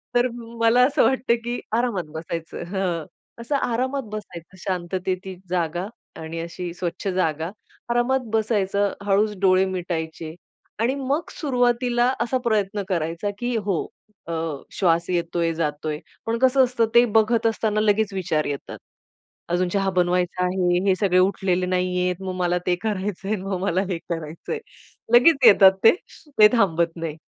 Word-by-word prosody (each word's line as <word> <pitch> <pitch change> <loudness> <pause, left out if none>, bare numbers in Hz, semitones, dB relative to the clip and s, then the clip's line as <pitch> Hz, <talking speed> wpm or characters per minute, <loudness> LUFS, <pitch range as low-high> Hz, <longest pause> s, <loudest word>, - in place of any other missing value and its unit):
तर 245 +1 +4
म 235 -1 -10
मला 230 +2 +5
असं 290 +1 +2
वाटतं 260 -2 +2
की 240 +1 -2 0.2
आरामात 200 -11 -1
बसायचं, 165 +1 -5
हं, 180 -5 -1 0.4
असं 260 +5 -2
आरामात 260 +2 -1
बसायचं 185 -4 -8
शांततेची 185 +1 -3
जागा 175 +1 -1 0.3
आणि 160 +1 -6
अशी 170 +1 -6
स्वच्छ 175 +2 -4
जागा. 165 -3 -1 0.4
आरामात 240 +2 +2
बसायचं. 205 -2 +1
हळूच 205 +1 +2
डोळे 190 -1 +4
मिटायचे 165 -3 -4 0.4
आणि 240 +4 +1
मग 280 +4 -2
सुरुवातीला 245 -3 +1
असा 260 +2 +1
प्रयत्न 210 -2 0
करायचा 170 +2 -1
की 240 0 -1
हो 200 -3 +1 0.5
अ, 170 - -4 0.4
श्वास 170 -2 +2
येतोय, 170 -1 0
जातोय. 150 -1 -2 0.3
पण 230 +1 0
कसं 260 +1 +5
असतं, 240 -2 +1
ते 240 - +8
बघत 225 +1 +2
असताना 220 -1 0
लगेच 210 -1 +2
विचार 165 -5 -1
येतात. 140 -1 -5 0.7
अजून 175 +1 +1
चहा 195 -1 +1
बनवायचा 180 0 +1
आहे, 180 -1 +1
हे 190 - +4
सगळे 185 -3 +3
उठलेले 185 -1 +1
नाहीयेत, 180 0 0
मग 185 - -3
मला 180 -1 +1
ते 180 - +3
करायचंय, 205 -1 -2
अन् 190 - -7
मग 195 -1 -2
मला 190 -1 +1
हे 180 - -1
करायचंय." 165 - -4 0.6
लगेच 275 +5 +7
येतात 195 -2 +8
ते. - - +10 0.5
ते 210 - +10
थांबत 170 -7 +2
नाही. 165 -3 -4
190 Hz, 145 wpm, -23 LUFS, 175-230 Hz, 0.7 s, ते